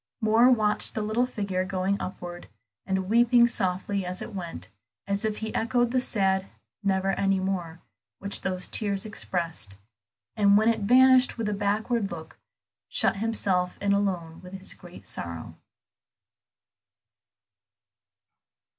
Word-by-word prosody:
Moor 225 +2 +5
watched 215 -4 +2
the 215 - -1
little 225 +4 +1
figure 200 -6 -2
going 190 +1 -1
upward, 175 -1 -7 0.4
and 190 -1 -1
weeping 235 +2 +5
softly 195 -2 -1
as 180 0 -4
it - - -7
went, 175 -4 -6 0.4
as 200 +2 -1
if 215 -1 -1
he 220 0 -5
echoed 240 +1 +1
the 255 - +2
sad 195 -5 +1 0.3
"never 195 -1 +1
any 195 -1 +2
more," 180 -3 -3 0.4
which 200 +1 -1
those 185 -1 -1
tears 200 -2 0
expressed, 165 - -4 0.6
and 200 -2 +5
when 220 +2 +4
it 230 - +1
vanished 255 +4 +5
with 225 -2 -2
a 210 - 0
backward 205 +2 0
look, 160 -2 -9 0.5
shut - - +1
himself 195 -4 0
in 200 0 +1
alone 180 -5 -1
with 180 0 -12
his 190 0 -2
great 175 0 -14
sorrow. 85 -1 -6
200 Hz, 135 wpm, -26 LUFS, 185-220 Hz, 0.6 s, Moor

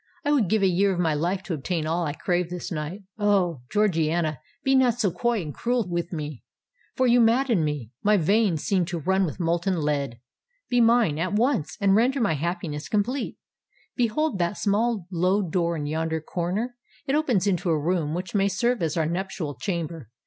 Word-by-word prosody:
I 290 - +2
would 245 -11 +2
give 215 -1 +2
a - - +5
year 190 +2 +2
of 180 - -2
my 165 -3 +2
life 175 +6 -1
to 185 - -4
obtain 160 +2 -2
all 165 +1 0
I 145 - -2
crave 175 +2 -1
this 180 +1 -6
night. 165 +5 -4 0.2
Oh! 190 -8 +2
Georgiana, 165 -7 +1 0.2
be 270 - +2
not 250 -3 +3
so 200 -6 +2
coy 230 +3 0
and 150 -2 -6
cruel 240 -3 -1
with 170 0 -3
me—for 160 - -6
you 245 0 +5
madden 230 -4 +3
me—my 150 - 0
veins 195 -1 +2
seem 190 -3 +2
to 175 -1 -4
run 190 +4 +2
with 165 - -5
molten 170 +1 0
lead. 140 -5 -1 0.5
Be 245 0 +4
mine 230 -10 +3
at 185 +4 -1
once—and 205 - +1
render 255 +5 +3
my 205 -9 +2
happiness 155 -1 -3
complete. 240 +6 -1 0.6
Behold 245 0 0
that 175 +3 0
small 210 -1 0
low 185 +3 +2
door 170 -1 0
in 145 - -3
yonder 160 +2 -1
corner: 185 +10 -3 0.3
it 270 - -1
opens 260 - +2
into 185 -3 0
a 160 - +3
room 160 -1 0
which 180 0 -5
may 200 -1 +3
serve 230 +5 0
as 160 0 -1
our 160 - +2
nuptial 175 -2 -3
chamber. 165 - -4
180 Hz, 185 wpm, -25 LUFS, 160-215 Hz, 0.6 s, a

